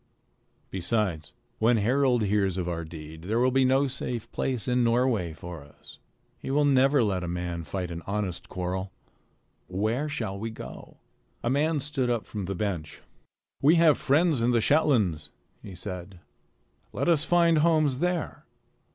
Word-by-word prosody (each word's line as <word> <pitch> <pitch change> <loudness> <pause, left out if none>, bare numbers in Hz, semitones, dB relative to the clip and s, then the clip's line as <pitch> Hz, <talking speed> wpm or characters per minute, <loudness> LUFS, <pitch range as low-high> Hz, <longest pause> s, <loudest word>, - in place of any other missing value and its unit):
Besides, 95 -4 -1 0.3
when 115 +2 +4
Harald 125 +2 +2
hears 100 -2 +1
of 90 -2 -2
our 85 -1 -3
deed, 80 0 -10
there 110 +4 0
will 125 +2 +3
not - - -6
be 130 -1 +3
a 135 +1 +3
safe 125 -3 -5
place 130 -3 -2
in 125 0 +2
Norway 115 -7 +1
for 85 0 -9
us. 70 +1 -15 0.4
He - - -7
will 145 +2 +3
never 135 -1 +4
let 95 -4 0
a - - -3
man 85 -1 -3
fight 90 +4 -4
out 85 - -5
an 85 - -9
honest 100 -3 -3
quarrel. 95 +1 -3 0.8
Where 110 +10 -1
shall 100 -9 -3
we 115 +2 -3
go?" 110 - -10 0.5
A 120 - +1
man 150 +3 +1
stood 135 -3 -1
up 120 -3 -1
from 105 -3 -5
the 95 +1 -3
bench. 90 -6 -4 0.6
"We 150 +5 +6
have 165 -3 +6
friends 150 -1 +2
in 120 - +2
the 120 -1 +3
Shetlands," 110 - +2 0.3
he 95 - -10
said. 90 +1 -7 0.7
"Let - - -1
us 165 -3 +4
find 170 -1 +4
homes 155 -5 +2
there." 175 -1 -2
115 Hz, 170 wpm, -27 LUFS, 90-135 Hz, 0.8 s, We